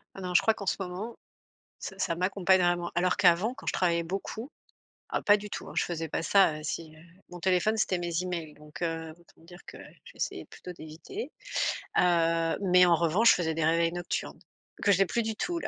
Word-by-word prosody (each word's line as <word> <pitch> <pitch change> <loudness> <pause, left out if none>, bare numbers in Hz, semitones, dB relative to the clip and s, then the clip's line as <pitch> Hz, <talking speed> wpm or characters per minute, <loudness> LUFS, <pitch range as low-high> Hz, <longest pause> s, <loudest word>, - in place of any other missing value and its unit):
Ah 195 - -8
non, 180 -1 -4
je - - +6
crois 225 - +3
qu'en 200 - -8
ce - - +1
moment, 195 +5 -5 0.6
ça - - -7
ça 170 -3 0
m'accompagne 185 +1 +2
vraiment, 175 -1 +1
alors 180 +1 +1
qu'avant 185 +7 +4
quand - - -13
je - - +1
travaillais 170 -2 +1
beaucoup, 195 - -5 0.6
ah - - -1
pas 205 - +6
du 210 0 -9
tout, - - -6
hein, - - -9
je - - +2
faisais 165 -2 -4
pas 155 - -2
ça, 180 -4 +4
heu, 155 - -9
si, 155 +1 -5
heu, - - -16 0.3
mon 175 -1 -9
téléphone, 190 +4 +2
c'était 190 -4 +1
mes 175 0 -2
emails, 170 -4 -5
donc 150 +2 -12
heu, 165 -1 -2
autant 170 - -24
dire 175 +2 -13
que - - -10 0.3
j'essayais - - -5
plutôt 180 - -10
d'éviter. 165 - -8 0.7
Heu, 165 -2 +2
mais 180 -2 +5
en 175 -1 +5
revanche, 170 +8 +4
je - - +4
faisais 160 -2 -1
des 160 -1 0
réveils 165 +1 +2
nocturnes, 175 0 -4 0.4
que 205 - +4
je 195 - +3
n'ai 195 - +5
plus 235 +5 -1
du 220 0 -3
tout 350 +6 -2
là. - - -4
175 Hz, 220 wpm, -29 LUFS, 165-195 Hz, 0.7 s, je